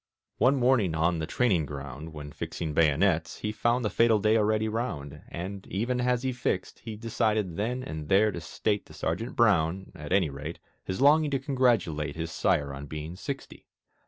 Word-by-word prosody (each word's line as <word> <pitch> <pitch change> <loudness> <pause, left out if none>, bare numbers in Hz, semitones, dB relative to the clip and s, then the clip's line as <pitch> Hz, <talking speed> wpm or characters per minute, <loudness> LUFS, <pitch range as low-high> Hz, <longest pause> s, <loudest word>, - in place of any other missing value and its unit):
One 130 +3 +5
morning 120 -10 +3
on 85 +1 +1
the 80 - -3
training 95 - +2
ground, 70 +3 -7
When 75 -2 -8
fixing 80 +1 -4
bayonets, 80 +2 +2
he 105 - -1
found 120 +2 +1
The - - +2
fatal 115 +2 +4
day 110 +2 +3
already 110 0 +2
round, 75 - -4
And, 95 +3 -6
even 120 +5 -1
as 125 0 +1
he 130 - 0
fixed, 120 -6 -2
he 110 -3 -7
Decided 110 -4 0
then 125 +6 -2
and 80 -5 -6
there 105 +3 +5
to - - -6
state 105 -1 -2
To - - -14
Sergeant 110 +10 -3
Brown 95 -5 +2
(at 75 0 -9
any 95 -6 +3
rate) 75 +4 -6 0.3
His 95 +6 -4
longing 150 +2 +5
to 135 -1 0
congratulate 115 - +1
His 80 0 -4
sire 70 -3 +1
on 70 +1 -7
being 75 +3 -6
sixty. 140 +8 -7
100 Hz, 185 wpm, -28 LUFS, 80-120 Hz, 0.3 s, One